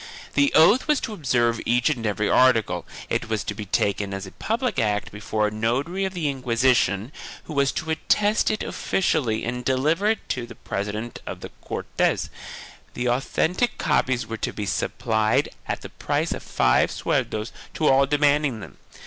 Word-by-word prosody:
The 285 0 +3
oath 205 - +6
was 300 -2 +3
to 220 - -4
observe 120 - +1
each 120 +1 +2
and 115 -6 -2
every 105 0 0
article; 125 -4 +3 0.2
it - - -2
was 110 -2 -1
to - - -3
be 105 0 -6
taken 100 +1 0
as 95 0 -5
a 95 - -10
public 230 0 -1
act 105 -2 0
before 105 +1 -1
a - - -3
notary 130 - -1
of 190 0 -4
the 165 -4 -1
Inquisition, 125 -4 +1 0.3
who 155 - -8
was 140 -1 +2
to 160 0 -3
attest 205 +6 +2
it 215 - -1
offi - - -3
cially 115 - +1
and 125 +1 -3
deliver 150 +10 +1
it 220 0 0
to 120 -2 -2
the 120 - -11
president 105 +4 -4
of - - -6
the - - -7
Cortes, - - -1 0.6
and 125 0 -1
authentic 160 - 0
copies 130 -1 +1
were 115 - -5
to - - -2
be 105 - -4
supplied 110 +1 0 0.2
at - - -3
the - - -7
price - - -2
of - - -3
five 60 - +2
sueldos 110 +2 -1 0.2
to 155 - +1
all 135 +1 +5
demanding 145 -3 +2
them. - - -11
125 Hz, 180 wpm, -24 LUFS, 110-155 Hz, 0.6 s, oath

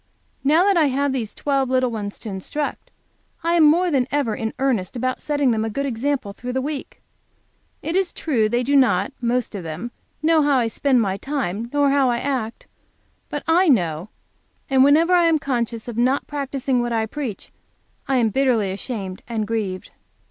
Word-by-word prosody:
Now 310 +6 +4
that 395 -2 +3
I 320 - +5
have 280 0 0
these 230 -5 -4
twelve 275 -2 0
little 255 -1 +2
ones 205 -2 -5
to 220 - -8
instruct, 205 +10 -4 0.5
I 335 +1 +1
am 340 -2 +5
more 340 +4 +4
than 260 -4 +2
ever 280 -6 0
in 220 0 -3
earnest 255 -7 0
about 255 +1 -2
setting 290 -4 +1
them 220 -1 0
a 225 - -2
good 280 +6 -2
example 255 -3 -2
through 245 +4 -6
the 260 - 0
week. 285 +1 -6 0.8
It 330 - -2
is 380 -2 +1
true 230 -9 0
they 240 +2 +1
do 285 +3 +1
not, 245 -5 +3
most 240 0 0
of 200 - -4
them, 165 +9 -6 0.3
know 320 0 +4
how 285 -2 +3
I 245 - +2
spend 260 +1 +2
my 195 -2 -1
time, 235 -5 -3
nor 285 -1 +3
how 275 -2 +3
I 240 - +1
act. 240 -4 -3 0.6
But 290 - -4
I 345 +2 +4
know, 175 - +1 0.6
and 265 -1 +6
whenever 315 +6 +5
I 350 -1 +5
am 330 -1 +4
conscious 235 -5 -2
of 235 -1 -4
not 255 +3 +2
practicing 275 -3 -1
what 240 0 -2
I 225 -1 +1
preach, 235 -4 -6 0.6
I 270 -2 +2
am 230 -3 +3
bitterly 235 -5 +1
ashamed 195 -2 -5
and 225 -3 -2
grieved. 210 -4 -3
255 Hz, 190 wpm, -22 LUFS, 225-285 Hz, 0.8 s, and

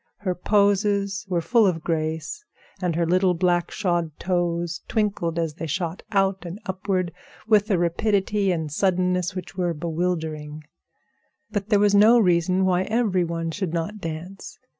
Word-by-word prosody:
Her 190 -3 -2
poses 200 +1 +1
were 175 -2 +1
full 220 +5 +4
of 165 -4 -1
grace, 160 - -2 0.4
and 175 -3 0
her 170 0 +1
little 180 +1 +2
black 175 0 +1
shod 175 -5 -1
toes 175 -3 -1
twinkled 200 -7 -1
as 165 -2 -1
they 165 +1 -6
shot 170 +2 -3
out 195 -2 +1
and 175 +3 -7
upward 185 -1 -1 0.4
with 215 -1 +4
a 195 - +3
rapidity 195 +3 +1
and 160 -4 -2
suddenness 180 +1 +1
which 185 +1 -7
were 175 -2 -1
bewildering. 160 -2 -3 0.9
But 205 -1 -3
there 210 - +5
was 205 0 +3
no 215 +4 +7
reason 185 -2 +3
why 185 0 +2
every 215 -5 +1
one 165 -1 -3
should 175 -2 -3
not 170 +6 -3
dance. 175 +2 -7
180 Hz, 155 wpm, -24 LUFS, 170-200 Hz, 0.9 s, no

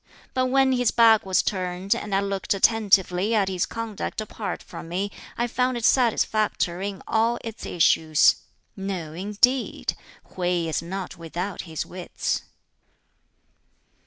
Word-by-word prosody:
But 255 0 +1
when 265 +1 +3
his 245 -2 +2
back 225 -3 +5
was 190 - +3
turned, 185 0 -1
and 205 -2 -3
I 195 - +3
looked 200 0 -1
attentively 200 -1 +3
at 200 -3 +2
his 185 -2 -1
conduct 230 -3 -5
apart 215 -3 -5
from 165 - -9
me, 195 +4 -2 0.3
I 240 - +1
found 250 +1 0
it 235 - -2
satisfactory 215 -6 +2
in 195 - -9
all 230 +2 +2
its 225 -1 -7
issues. 160 -2 +4 0.4
No, 190 -5 -4
indeed! 210 +8 +1 0.4
Hwķi 175 -2 0
is 160 -1 -1
not 185 +1 -6
without 175 +2 -5
his 160 - -3
wits." 180 -1 -3
195 Hz, 135 wpm, -25 LUFS, 180-225 Hz, 0.4 s, back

